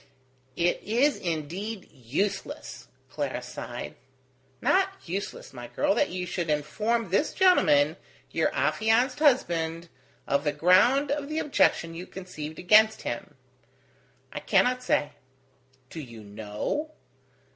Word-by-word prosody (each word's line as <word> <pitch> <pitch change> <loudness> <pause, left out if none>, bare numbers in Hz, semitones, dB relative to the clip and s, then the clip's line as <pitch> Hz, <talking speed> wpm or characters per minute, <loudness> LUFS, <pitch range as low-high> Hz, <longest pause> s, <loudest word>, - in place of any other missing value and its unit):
"It 175 +1 +1
is 250 +8 +2
indeed 180 +6 -4
useless," 140 - -4 0.2
Clara - - -4
sighed. 75 - -7 0.7
"Not 385 0 +3 0.2
useless, 200 - -5
my - - -8
girl, - - +1
that 290 - +1
you 180 0 -4
should 175 -2 -3
inform 190 +9 -1
this 200 +11 +1
gentleman, 160 - +4 0.3
your - - +1
affianced 235 +5 +1
husband, 170 - +1 0.4
of 140 +1 +1
the 150 -1 0
ground 185 - +4
of 285 0 -2
the 310 - -3
objection 220 - +2
you 175 +2 -7
conceived 160 -5 -8
against 215 +4 +5
him." 120 - -5 1.0
"I - - -4
cannot 250 +6 +2
say." 150 -11 +1 0.8
"Do 165 - -7
you 115 -7 -10
know?" 105 - -4
185 Hz, 120 wpm, -27 LUFS, 155-250 Hz, 1.0 s, against